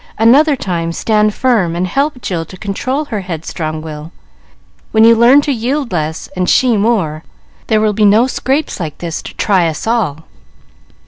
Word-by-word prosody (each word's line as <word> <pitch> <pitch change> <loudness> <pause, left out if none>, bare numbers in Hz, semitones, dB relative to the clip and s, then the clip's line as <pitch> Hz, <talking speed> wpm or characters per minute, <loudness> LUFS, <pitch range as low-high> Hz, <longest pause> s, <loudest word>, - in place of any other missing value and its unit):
Another 280 +7 +4
time, 170 -8 -3
stand 215 +2 +1
firm 210 -8 0
and 175 +1 -1
help 275 +6 -2
Jill 170 -3 -2
to 185 - -12
control 255 +10 -3
her 215 -7 -4
headstrong 160 -3 -5
will. 155 0 -8 0.8
When 220 0 +4
you 230 +1 +7
learn 240 +5 +6
to 290 - -2
yield 260 +2 -2
less 160 -2 -3
and 180 -1 -1
she 250 -3 +3
more, 200 -8 0 0.4
there 220 -2 +2
will 215 -1 +1
be 215 +1 0
no 215 +4 +5
scrapes 265 +2 -2
like 155 -4 -5
this 170 -2 -5
to - - -10
try 190 -5 +2
us 155 -2 -4
all." 220 -10 -1
210 Hz, 175 wpm, -14 LUFS, 170-240 Hz, 0.8 s, you